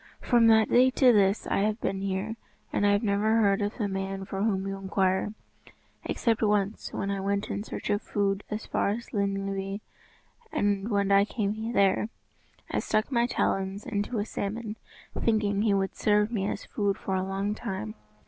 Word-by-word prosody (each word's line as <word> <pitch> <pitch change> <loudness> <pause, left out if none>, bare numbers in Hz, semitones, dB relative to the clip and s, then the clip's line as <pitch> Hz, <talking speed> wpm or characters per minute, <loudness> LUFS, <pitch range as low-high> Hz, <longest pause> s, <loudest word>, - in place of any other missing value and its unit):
From 235 -2 +4
that 220 -1 +6
day 255 +2 +5
to 255 -1 +5
this 200 -1 +3
I - - 0
have 210 +2 0
been 195 -2 -2
here, 195 +3 -2 0.4
and 205 - +2
I - - +5
have 205 +2 +2
never 210 +1 +2
heard 200 -3 +3
of 205 +1 -2
the 215 -5 0
man 195 0 -3
for 195 0 -4
whom 195 -3 +1
you 195 0 -3
inquire, 190 +1 0 0.7
except 230 -3 0
once 210 -1 0
when 200 - -2
I 200 - -2
went 200 +1 -1
in 205 - -3
search 215 - -4
of 205 +1 +1
food 200 -1 -1
as 215 +1 -4
far - - 0
as 230 +4 -4
Llyn 200 -2 0
Llyw. 195 0 -3 0.7
And 205 +1 0
when 200 -2 +1
I 200 0 +6
came 220 +2 -2
there, 200 +1 +3 0.6
I - - +1
stuck 215 +5 0
my 235 -1 +2
talons 195 -3 -1
into 220 -1 -2
a 205 - 0
salmon, 215 +1 -4 0.4
thinking 210 -3 +1
he 215 -2 +3
would 195 -1 0
serve 210 +1 +2
me 200 -4 -1
as - - -4
food 200 -2 -1
for 190 - -4
a 190 - +1
long 195 +2 -2
time. 190 - -5
205 Hz, 190 wpm, -28 LUFS, 195-215 Hz, 0.7 s, that